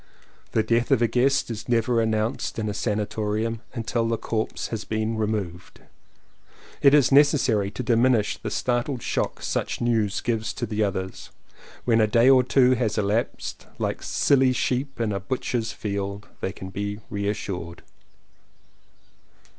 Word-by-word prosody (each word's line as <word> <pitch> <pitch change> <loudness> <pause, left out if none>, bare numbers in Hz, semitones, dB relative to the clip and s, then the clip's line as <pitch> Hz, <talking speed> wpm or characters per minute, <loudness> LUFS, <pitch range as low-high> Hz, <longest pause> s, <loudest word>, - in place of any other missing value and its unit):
The 110 - +3
death 115 +2 +1
of 120 - +3
a - - +4
guest 135 +1 +2
is 110 +1 -6
never 115 0 +2
announced 110 +3 -1
in 110 -1 -2
a 105 - -2
sanatorium 105 +1 -2
until 115 0 -1
the 115 0 0
corpse 110 0 -3
has 110 -2 -4
been 110 +1 -2
removed. 105 -5 -3 1.0
It 140 +1 +7
is 140 -3 +4
necessary 135 -8 +4
to 125 - -5
diminish 115 -2 +3
the 110 - -4
startled 120 +3 -1
shock - - -2
such - - -2
news 110 -4 +1
give 115 -2 0
to 120 - -2
the 110 -1 -1
others. 95 -2 -4 0.6
When 115 -2 +4
a 110 - +4
day 115 +4 +5
or 130 -1 +7
two 125 0 +4
has 115 -4 0
elapsed, 105 +2 -2
like - - -2
silly 130 -2 +3
sheep 130 +2 -1
in 115 -2 0
a 100 - -1
butcher's 115 +2 -2
field, 100 0 -4
they 95 - -2
can 95 0 -9
be 100 +2 -4
re 100 -1 -2
assured. 90 -5 -5
110 Hz, 155 wpm, -25 LUFS, 105-120 Hz, 1.0 s, It